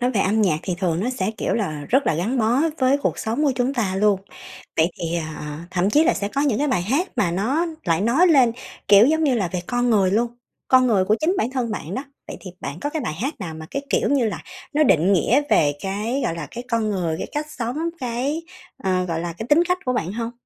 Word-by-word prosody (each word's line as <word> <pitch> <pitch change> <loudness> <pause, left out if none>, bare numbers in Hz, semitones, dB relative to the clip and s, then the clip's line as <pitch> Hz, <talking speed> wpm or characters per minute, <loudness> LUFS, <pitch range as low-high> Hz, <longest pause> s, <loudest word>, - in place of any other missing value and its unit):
nói 245 +1 +1
về 215 - 0
âm 215 +3 +2
nhạc 160 -7 +2
thì 185 - -2
thường 175 -3 0
nó 235 +6 -1
sẽ, 210 -6 -1
kiểu - - 0
là, 155 -10 -2
rất 270 +3 +2
là - - +2
gắn 210 +11 -1
bó 230 +2 +2 0.2
với 260 +1 +3
cuộc - - -1
sống 235 +8 -1
của 275 - +3
chúng 250 +2 0
ta 200 -7 -1
luôn. 205 -1 +3 0.6
Vậy 160 +2 +3
thì, 170 0 -2 0.2
ờ 150 0 -6
thậm 185 +2 +1
chí 300 +7 +4
là - - +3
sẽ 200 - -2
có 275 - -2
những 275 -7 +1
cái 295 - +1
bài 250 -10 +1
hát 280 - 0
mà 175 -5 +2
nó 255 - 0 0.2
lại 165 -2 +1
nói 240 - +4
lên, 265 -9 +5 0.4
kiểu, 205 +2 +8
giống 315 +2 +2
như 275 -4 +3
là 200 -7 0
về 180 - -1
con 245 0 0
người 195 -4 +3
luôn, 230 +4 +1 0.4
con 255 -1 +5
người 205 -6 +3
của 210 +3 +2
chính 335 +5 +2
bản 235 - 0
thân 255 -3 -2
bạn 180 -4 -5
đó. 265 - -4 0.2
Vậy - - -6
thì 185 - -8
bạn 140 +4 -6
có 290 - -2
cái 315 - -3
bài 220 - -3
hát 260 - -3
nào 170 -5 -5
mà 160 0 -9
cái, 275 - -3
kiểu - - +2
như 275 -5 +2
là, - - -5 0.3
nó 305 - +4
định 180 - +4
nghĩa 235 - +3
về 145 -2 +4
cái, 210 +7 -2
gọi 165 - -1
là, 165 -3 -5
cái 240 - -7
con 225 -2 +1
người, 175 -5 -1
cái - - -4
cách 300 +1 -2
sống, 245 -2 -4 0.2
cái, 260 +6 -2 0.4
ờ, 185 -1 +1
gọi 165 -2 -2
là, 170 0 -4
cái 195 +7 -7
tính 305 +3 +5
cách 360 0 +2
của 255 - 0
bạn 190 -7 -2
hông? 230 +1 -3
225 Hz, 265 wpm, -22 LUFS, 185-260 Hz, 0.6 s, kiểu